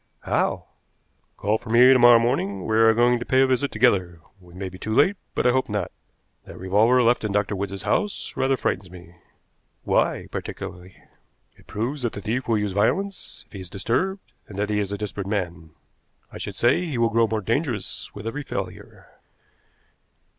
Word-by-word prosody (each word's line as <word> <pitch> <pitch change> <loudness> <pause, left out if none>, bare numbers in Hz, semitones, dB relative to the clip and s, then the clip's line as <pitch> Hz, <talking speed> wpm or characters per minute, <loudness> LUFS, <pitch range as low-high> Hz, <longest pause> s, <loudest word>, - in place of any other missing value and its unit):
"How?" - - 0 0.7
"Call 105 +3 0
for - - -12
me 125 +3 +7
to 130 - +4
morrow 120 -1 +8
morning; 100 -6 -1
we 110 - 0
are 115 0 +6
going 120 +2 +3
to - - -4
pay 130 +2 +3
a - - +6
visit 130 +2 0
together. 95 -8 +2 0.2
We 90 -1 -17
may 95 +1 -5
be 95 0 -10
too 110 0 -3
late, 185 +10 +4 0.2
but - - 0
I 125 - +5
hope 130 -1 0
not. 105 -4 -2 0.5
That - - -11
revolver 110 +7 +3
left 120 0 +2
in 105 - -2
Dr. 100 0 0
Wood's 100 0 -4
house 205 -1 -1
rather 135 0 +1
frightens 95 -5 -2
me." 85 -1 -13 0.7
"Why, - - +1
particularly?" 90 0 -7 0.6
"It - - -23
proves 125 +7 -3
that 120 -2 -2
the 100 - -6
thief 115 +5 -2
will 115 -2 +2
use 105 -1 -1
violence 185 - -1
if - - -27
he 100 - -7
is 90 -1 -9
disturbed, 185 - -2
and 100 - -10
that 105 +1 -1
he 105 - +1
is 100 -1 -2
a 100 - -3
desperate 100 -1 -5
man. 85 -6 -3 0.6
I - - -8
should 100 - -6
say 120 - +2
he 155 -8 -3
will 115 -1 +2
grow 115 0 +3
more 110 0 -2
dangerous 115 - -2
with 105 +1 -8
every 140 +6 -3
failure." 140 - -7
110 Hz, 195 wpm, -24 LUFS, 100-125 Hz, 0.7 s, morrow